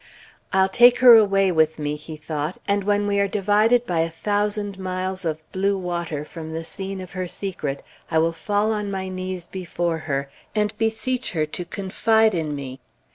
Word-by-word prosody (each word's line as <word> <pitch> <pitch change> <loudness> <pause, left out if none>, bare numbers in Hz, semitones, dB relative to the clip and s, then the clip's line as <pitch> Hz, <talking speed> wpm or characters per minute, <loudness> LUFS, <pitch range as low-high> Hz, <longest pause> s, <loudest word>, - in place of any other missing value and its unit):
"I'll 190 -1 +4
take 240 +5 +6
her 245 -2 +9
away 195 -3 +4
with 160 -2 +2
me," 150 -1 -2
he 155 +1 -9
thought; 155 +2 -4
"and 200 -1 +1
when 205 0 +2
we 200 0 +1
are 200 - +3
divided 210 +5 +3
by 175 -5 -1
a 165 +1 +1
thousand 205 +3 -2
miles 185 0 -3
of 155 -1 -1
blue 195 +1 +1
water 170 -5 -3
from 160 0 -8
the 165 +1 -4
scene 195 +3 -5
of 185 - -9
her 185 -2 -3
secret, 165 -7 -4 0.3
I 160 - +1
will 165 +1 +2
fall 205 +5 0
on 210 -1 -3
my 190 -1 -3
knees 185 -1 -4
before 175 -2 -3
her, 140 -3 -2 0.3
and 210 0 0
beseech 235 +3 -1
her 155 -3 +1
to 175 +3 -6
confide 220 +4 +2
in 155 -4 -2
me." 135 -2 -7
185 Hz, 185 wpm, -23 LUFS, 165-205 Hz, 0.3 s, her